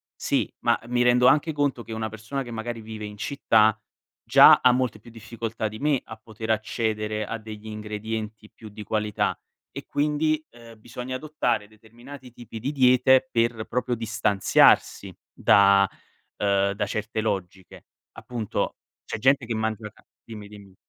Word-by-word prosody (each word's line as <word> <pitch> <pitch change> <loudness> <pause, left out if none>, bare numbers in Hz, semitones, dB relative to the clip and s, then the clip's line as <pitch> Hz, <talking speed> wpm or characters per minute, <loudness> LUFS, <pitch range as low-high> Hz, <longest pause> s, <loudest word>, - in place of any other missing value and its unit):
sì, - - -1
ma - - +2
mi 120 0 0
rendo 125 0 +4
anche 155 +3 +3
conto 145 -4 -1
che 115 - -8
una 110 0 -3
persona 110 +6 -5
che 120 - -10
magari 115 0 -5
vive 110 -1 -8
in 105 0 -9
città 110 -3 +2 0.4
già - - +7
ha 125 - +6
molte 125 -4 -1
più 115 - -15
difficoltà 115 0 -5
di 110 +1 -10
me 145 -2 +1
a 110 - -10
poter 110 0 -9
accedere 110 -1 -2
a 115 - -4
degli 110 0 -10
ingredienti 105 0 -6
più 110 - -13
di 105 +1 -9
qualità 105 0 -1 0.4
e - - -8
quindi, 150 +1 0
ehm, 115 -2 -15
bisogna 125 +3 -7
adottare 125 -7 -2
determinati 120 +5 -14
tipi 115 -2 -10
di 130 +6 -3
diete 130 0 +4
per 115 -1 0
proprio 125 0 -2
distanziarsi 110 -3 +2 0.2
da, 100 0 +5 0.5
uhm, 100 -1 +1
da 105 +1 -2
certe 105 +2 -3
logiche. 95 -4 -5 0.3
Appunto 115 -4 -4 0.3
c'è - - -5
gente 135 +2 +3
che 115 - -2
mangia 110 0 -3
ca 110 - -25 0.2
dimmi, 105 -3 -9
dimmi. 100 -2 -14
110 Hz, 160 wpm, -25 LUFS, 105-125 Hz, 0.5 s, già